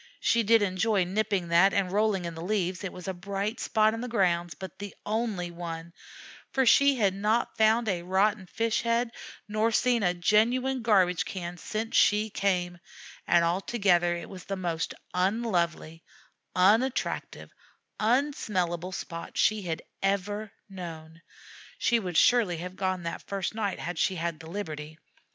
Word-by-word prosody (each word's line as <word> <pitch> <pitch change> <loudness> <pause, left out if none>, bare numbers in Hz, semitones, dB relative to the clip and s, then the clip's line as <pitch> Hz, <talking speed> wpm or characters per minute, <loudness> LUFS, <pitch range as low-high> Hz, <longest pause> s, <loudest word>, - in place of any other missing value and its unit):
She 230 - +2
did 225 0 +4
enjoy 195 +1 +1
nipping 195 -1 -1
that 175 +4 +5
and 190 -2 +1
rolling 205 -3 +1
in 170 - -4
the 165 - -8
leaves; 185 -1 -1
it 195 - -3
was 180 -1 -10
a 190 - -1
bright 200 +4 -3
spot 215 -1 +2
in 225 - -4
the 250 - -4
grounds; 175 -8 +1
but 190 -3 -9
the 205 -1 -7
only 210 -5 -2
one, 170 -1 -7 0.6
for 265 -1 +2
she 280 +3 +6
had 200 -6 +2
not 210 +4 0
found 220 +1 +3
a 180 -4 0
rotten 190 +2 +1
fish 230 +3 0
head 235 0 0 0.4
nor 215 +2 +1
seen 240 +1 +2
a 180 -3 +1
genuine 240 +8 +2
garbage 190 -6 +3
can 175 -2 -6
since 220 +5 -4
she 210 +1 +4
came, 180 -3 -1 0.5
and 170 -1 +4
altogether 175 -1 +2
it 170 - -7
was 185 -2 -10
the 195 - -3
most 170 -3 -3 0.2
unlovely, 180 -5 -1 0.5
unattractive, 220 +8 +1 0.5
unsmellable 210 - 0
spot 170 -2 -7
she 215 0 +3
had 165 -4 -4 0.2
ever 200 +2 -1 0.2
known. 165 -4 -9 0.6
She 235 -1 +2
would 180 -6 -3
surely 225 -9 +4
have 180 +2 -7
gone 185 -2 -2
that 170 - -6
first 195 -1 -2
night 215 -3 -2
had 175 -1 -5
she 190 - +1
had 170 -2 -3
the 160 - -10
liberty. 155 -5 -6
195 Hz, 160 wpm, -28 LUFS, 175-220 Hz, 0.6 s, she